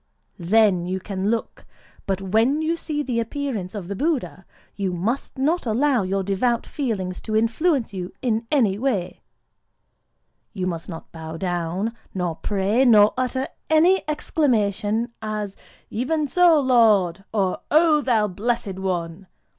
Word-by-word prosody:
Then 185 Hz, -1 st, +3 dB
you 190 Hz, +1 st, -2 dB
can 195 Hz, +1 st, -3 dB
look. 230 Hz, 0 st, -3 dB, 0.4 s
But 195 Hz, 0 st, -1 dB
when 225 Hz, +10 st, +2 dB
you 325 Hz, +2 st, +1 dB
see 300 Hz, -3 st, -3 dB
the 245 Hz, -4 st, -1 dB
appearance 230 Hz, -5 st, -3 dB
of 195 Hz, -4 st, -5 dB
the 200 Hz, -, -4 dB
Buddha, 280 Hz, -, -2 dB, 0.3 s
you 195 Hz, -3 st, -2 dB
must 220 Hz, +13 st, -3 dB
not 300 Hz, +2 st, 0 dB
allow 250 Hz, +2 st, +2 dB
your 195 Hz, +1 st, -1 dB
devout 225 Hz, +5 st, 0 dB
feelings 200 Hz, -10 st, -3 dB
to 215 Hz, -, -3 dB
influence 230 Hz, -, +1 dB
you 180 Hz, -2 st, -5 dB
in 230 Hz, -2 st, -1 dB
any 220 Hz, -9 st, +2 dB
way;—you 200 Hz, -3 st, -7 dB
must 170 Hz, -2 st, -4 dB
not 165 Hz, -2 st, -9 dB
bow 160 Hz, 0 st, -7 dB
down, 180 Hz, +4 st, -2 dB, 0.2 s
nor 180 Hz, -3 st, -1 dB
pray, 205 Hz, +7 st, +1 dB
nor 215 Hz, -4 st, +6 dB
utter 255 Hz, +1 st, -1 dB, 0.2 s
any 330 Hz, +4 st, +5 dB
such -, -, -11 dB
exclamation 230 Hz, -7 st, 0 dB
as, 215 Hz, -2 st, -4 dB, 0.4 s
'Even 295 Hz, +7 st, -1 dB
so, 345 Hz, 0 st, +5 dB
Lord!' 215 Hz, -9 st, +3 dB
or 195 Hz, -4 st, 0 dB
'_O 310 Hz, -1 st, +4 dB
thou 225 Hz, -5 st, +2 dB
Blessed 205 Hz, 0 st, -2 dB
One! 180 Hz, -1 st, -3 dB
215 Hz, 140 wpm, -23 LUFS, 190-260 Hz, 0.4 s, nor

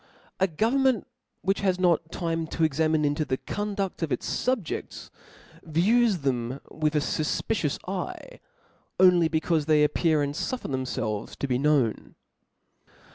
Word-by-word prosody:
A 190 Hz, -, +4 dB
government 235 Hz, -, +1 dB, 0.4 s
which 195 Hz, +1 st, +1 dB
has 185 Hz, -2 st, +1 dB
;not 170 Hz, -3 st, +2 dB
time 165 Hz, -2 st, -2 dB
toex 155 Hz, -3 st, 0 dB
ermine 155 Hz, -1 st, +2 dB
into 145 Hz, +2 st, +1 dB
the 130 Hz, -3 st, -2 dB
conduA 200 Hz, +1 st, -3 dB
of 165 Hz, -, -2 dB
its -, -, -2 dB, 0.2 s
fubj^dls, 245 Hz, -9 st, -3 dB, 0.5 s
views 205 Hz, +7 st, +2 dB
them 130 Hz, -1 st, -1 dB
with 155 Hz, 0 st, -1 dB
a -, -, +4 dB
fufpicious 150 Hz, +1 st, -1 dB
eye. -, -, -5 dB, 0.6 s
Only 180 Hz, -3 st, +6 dB
becaufe 160 Hz, -1 st, 0 dB
they 155 Hz, -1 st, +5 dB
appear, 155 Hz, +1 st, +2 dB
^nd -, -, -2 dB
fuffer 245 Hz, -, -4 dB
themfelves 125 Hz, -5 st, -3 dB
to 140 Hz, -, -3 dB
be 125 Hz, -1 st, 0 dB
known. 140 Hz, -6 st, +1 dB
160 Hz, 135 wpm, -26 LUFS, 145-190 Hz, 0.6 s, Only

